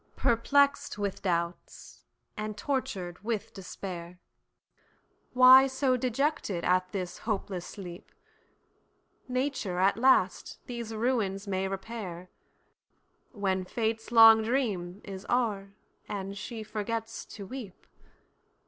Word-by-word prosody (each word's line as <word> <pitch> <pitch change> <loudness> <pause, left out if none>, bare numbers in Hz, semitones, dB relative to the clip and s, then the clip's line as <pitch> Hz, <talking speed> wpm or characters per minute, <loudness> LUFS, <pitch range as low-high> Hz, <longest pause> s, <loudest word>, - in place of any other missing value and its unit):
Perplex'd 280 +2 +2
with 200 -2 -3
doubts, 170 -2 -4 0.3
and 215 0 -5
tortured 205 -9 -3
with 220 -2 -3
despair, 180 -2 -7 1.2
Why 255 +1 +9
so 265 -1 +1
dejected 255 - -1
at 185 0 +2
this 185 -3 -4
hopeless 195 -5 -3
sleep? 180 -3 -9 1.2
Nature 255 -7 -2
at 190 +3 +3
last 260 +3 +2
these 235 -3 -6
ruins 215 -4 -1
may 190 -1 -1
repair, 190 -3 -6 1.0
When 195 -5 -1
fate's 225 +3 -2
long 225 -1 +9
dream 210 -6 -1
is 195 -1 -8
o'er, 205 -5 0 0.3
and 200 -1 -4
she 220 +2 -6
forgets 225 +1 -4
to 200 - -7
weep. 230 -4 -9
210 Hz, 105 wpm, -29 LUFS, 190-240 Hz, 1.2 s, Why